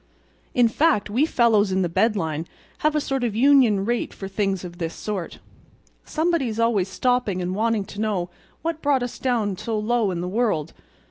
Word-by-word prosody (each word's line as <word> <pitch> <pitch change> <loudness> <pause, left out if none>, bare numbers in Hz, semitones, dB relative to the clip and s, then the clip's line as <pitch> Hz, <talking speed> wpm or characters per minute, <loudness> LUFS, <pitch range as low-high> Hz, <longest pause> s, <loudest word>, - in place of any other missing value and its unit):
In 245 -1 +5
fact, 230 -4 +1
we 265 +8 +2
fellows 220 -7 +3
in 190 0 +1
the - - +1
bed 215 +6 +2
line 160 -3 -2 0.3
have 305 0 +1
a - - +3
sort 270 -3 -2
of 230 -4 -1
union 240 -6 +4
rate 240 +1 -2
for 195 - -6
things 195 -1 -1
of 175 0 -9
this 165 -1 -3
sort. 200 -5 -5 0.7
Somebody's 310 -9 0
always 225 -5 +2
stopping 245 -2 0
and 180 0 -2
wanting 220 0 0
to 205 +2 -7
know 190 -5 -1 0.3
what 325 -1 -2
brought 280 -3 +2
us 245 - -6
down 225 -6 0
so 220 +2 -3
low 220 0 +1
in 180 -2 -3
the 175 - -3
world. 185 -7 0
215 Hz, 190 wpm, -23 LUFS, 190-245 Hz, 0.7 s, In